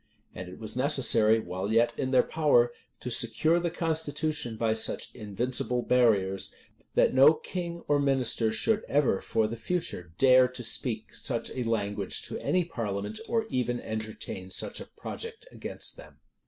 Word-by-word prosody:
And 90 0 -8
it 90 - -11
was 110 +1 -4
necessary, 120 -5 +4
while 95 0 -4
yet 115 +1 +3
in 130 - -2
their 130 -1 +4
power, 140 -7 +2 0.3
to 125 - -5
secure 135 +9 +2
the 175 0 -1
constitution 155 -6 -1
by 110 0 +1
such 110 - -1
invincible 120 +3 -1
barriers, 100 -6 +2 0.4
that - - +3
no 140 +4 +7
king 170 +1 -6
or 145 -1 +3
minister 130 -5 +2
should 220 - +1
ever, 140 -8 +1
for 110 - 0
the 110 +2 -3
future, 115 - -3
dare 130 -1 +6
to 125 -1 -8
speak 115 -1 -1
such 120 -3 -2
a 125 -2 -4
language 105 -3 -2
to - - -5
any 180 -2 0
parliament, 105 - -4
or 225 -1 0
even 120 -1 -1
entertain 110 -4 -5
such - - -1
a - - -9
project 460 0 -7
against - - -3
them. - - -14
120 Hz, 160 wpm, -28 LUFS, 110-145 Hz, 0.4 s, no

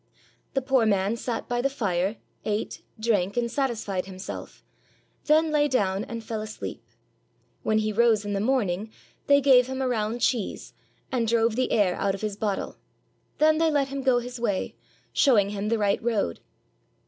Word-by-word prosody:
The 270 - +1
poor 260 -4 +3
man 200 +1 +2
sat 235 0 -4
by 245 -1 0
the 275 - +1
fire, 195 -6 -1 0.3
ate, 210 0 -3 0.2
drank, 205 -3 +1
and 235 -1 0
satisfied 220 -9 -2
himself, 190 +1 -8 0.6
then 315 +1 +4
lay 295 -1 +3
down 200 -7 0
and 230 -1 -6
fell 220 -1 -4
asleep. 215 0 -7 0.8
When 215 - +1
he 215 0 0
rose 220 -1 +3
in 205 - -2
the 200 - 0
morning, 215 -4 0 0.4
they 280 0 +6
gave 255 -2 +6
him 265 0 -4
a 265 - 0
round 225 -1 -1
cheese, 235 -4 -1 0.4
and 240 -3 0
drove 230 0 +2
the 255 +1 0
air 200 -5 +3
out 195 -1 0
of 195 - -9
his 210 -2 -2
bottle; 205 -1 -3 0.6
then 310 +1 +4
they 325 0 +3
let 285 -3 +1
him 275 0 -4
go 260 -2 +3
his 245 0 -5
way, 205 -5 -1 0.4
showing 210 -8 +4
him 205 +1 -3
the 230 - +2
right 205 -2 +1
road. 220 - -1
225 Hz, 175 wpm, -26 LUFS, 205-255 Hz, 0.8 s, they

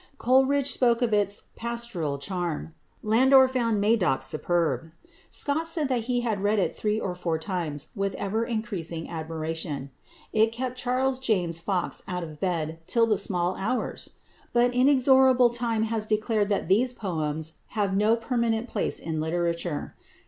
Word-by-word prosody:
Coleridge 265 +3 +3
spoke 240 -1 +2
of 230 -3 +1
its 205 -1 +1
"pastoral 235 -11 -3
charm." 170 0 -4 0.3
Landor 260 +5 +6
found 235 -5 0
"Madoc" 200 -10 +2
superb. 165 +3 -1 0.4
Scott 315 +3 +1
said 320 -4 -1
that 240 -4 0
he 245 0 0
had 220 -5 -1
read 205 +2 +2
it 195 - 0
three 215 0 -1
or 185 - -3
four 175 -2 -2
times 160 -4 -3
with 195 -1 -2
ever 220 +3 -1
increasing 205 -9 -4
admiration. 160 -3 -4 0.4
It 220 +1 +3
kept 250 +2 -4
Charles 255 +1 0
James 180 -10 +1
Fox 180 +1 -1
out 180 -1 -3
of 155 -2 -9
bed 165 -3 -2
till 230 -1 +3
the 220 -2 +2
small 180 -2 0
hours! 225 +6 -3 0.4
But 245 +1 +3
inexorable 260 -1 +5
time 235 -2 0
has 220 -1 -2
declared 215 -1 +1
that 200 - 0
these 245 +7 +3
poems 160 -6 -3 0.2
have 200 -2 +1
no 210 +3 +4
permanent 235 0 -1
place - - -1
in 160 -1 -4
literature. 170 -1 -2
210 Hz, 150 wpm, -26 LUFS, 170-240 Hz, 0.4 s, Landor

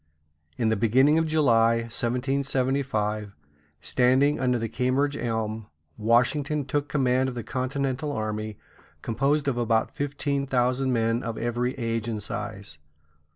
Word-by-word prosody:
In 115 -2 +1
the 110 - +2
beginning 130 +8 +4
of 165 - 0
July, 115 -7 +3
1775, 125 -3 -1 0.5
standing 130 +3 +3
under 125 -1 +2
the 115 -1 -2
Cambridge 130 +5 0
Elm, 110 -3 -3 0.3
Washington 135 +6 +1
took 145 +2 -1
command 130 -2 +2
of 125 - -7
the 120 - -4
continental 135 +3 -2
army, 110 -3 -3 0.5
composed 140 +6 0
of 125 -3 0
about 115 -1 +1
fifteen 140 0 -2
thousand 130 +1 +1
men 115 0 +1
of 115 -1 -4
every 120 +2 -1
age 115 -2 -2
and 110 -3 -3
size. 100 -7 -6
125 Hz, 130 wpm, -26 LUFS, 115-135 Hz, 0.5 s, beginning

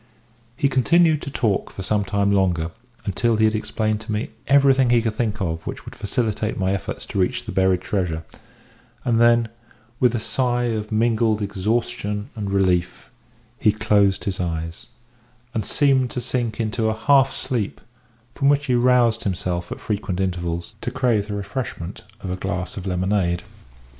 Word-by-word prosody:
He 140 - +3
continued 155 +4 +3
to - - -5
talk 115 -7 0
for 95 - -7
some 105 +2 +1
time 100 0 +1
longer, 90 -4 +1 0.3
until 115 +4 +1
he 110 0 +3
had 110 - +3
explained 110 0 -1
to 110 - -6
me 105 +1 -2 0.2
everything 135 -2 +5
he 120 -1 +5
could 115 -1 -1
think 110 -2 -1
of 80 -3 -2
which - - -6
would - - -9
facilitate 110 -1 -1
my 95 0 +1
efforts 100 - -4
to - - -3
reach 90 - 0
the - - -5
buried 95 -1 +2
treasure; 90 -5 -2 0.8
and 115 -2 +3
then, 120 -1 +5 0.5
with 125 -1 +3
a - - 0
sigh 125 +1 0
of 110 -3 -2
mingled 110 -1 +2
exhaustion 105 0 -2
and 105 -3 -3
relief, 95 -1 0 0.5
he 110 - +4
closed 105 -3 +2
his 95 -2 -3
eyes, 85 -1 -4 0.7
and 110 - -1
seemed 135 0 +3
to 125 - -3
sink 120 -2 -2
into 110 0 0
a 110 - -2
half 135 +3 +4
sleep, 120 -7 -3 0.5
from 140 - +2
which 145 0 +3
he 130 - +1
roused 120 -2 +3
himself 90 -2 -2
at - - -5
frequent 100 -3 -3
intervals, 85 -2 -2
to - - -2
crave 110 -5 +1
the 105 - -3
refreshment 100 -2 -5 0.2
of 95 - -4
a - - -1
draught 90 0 -3
of 95 -1 -6
lemonade. 90 -1 0
105 Hz, 170 wpm, -22 LUFS, 95-120 Hz, 0.8 s, everything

